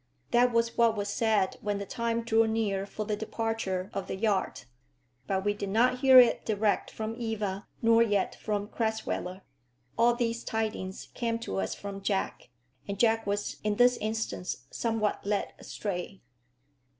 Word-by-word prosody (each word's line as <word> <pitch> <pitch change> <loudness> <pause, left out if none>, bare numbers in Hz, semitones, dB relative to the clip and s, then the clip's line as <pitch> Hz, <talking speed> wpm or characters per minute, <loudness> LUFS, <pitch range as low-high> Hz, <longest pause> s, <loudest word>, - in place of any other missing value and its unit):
That 245 +1 +4
was 230 0 0
what 230 -2 +4
was 205 0 -2
said 210 -3 +1
when 205 -1 -1
the 200 - -4
time 230 +2 -1
drew 225 0 +3
near 205 -3 0
for 215 +1 -5
the 210 0 -1
departure 215 -3 -2
of 195 -1 -3
the - - -3
yacht. 200 -1 0 0.6
But 190 0 -1
we 205 - +2
did 200 -1 -5
not 245 +5 +3
hear 260 -1 +9
it 245 -2 +5
direct 210 -1 +1
from 220 0 -4
Eva, 215 -3 -3 0.2
nor 230 0 +6
yet 205 -4 +2
from 205 -1 -3
Crasweller. 220 -5 -2 0.6
All 235 +1 +5
these 235 -1 -1
tidings 215 -4 -3
came 230 -1 -1
to 95 - -3
us 95 - -2
from 200 -1 -7
Jack, 195 - -2 0.4
and 200 0 -3
Jack 225 0 +2
was 205 0 -2
in 210 -1 +1
this 245 +2 +5
instance 220 -4 -3
somewhat 225 -3 -1
led 205 0 -1
astray. 195 -1 -5
215 Hz, 160 wpm, -29 LUFS, 200-230 Hz, 0.6 s, hear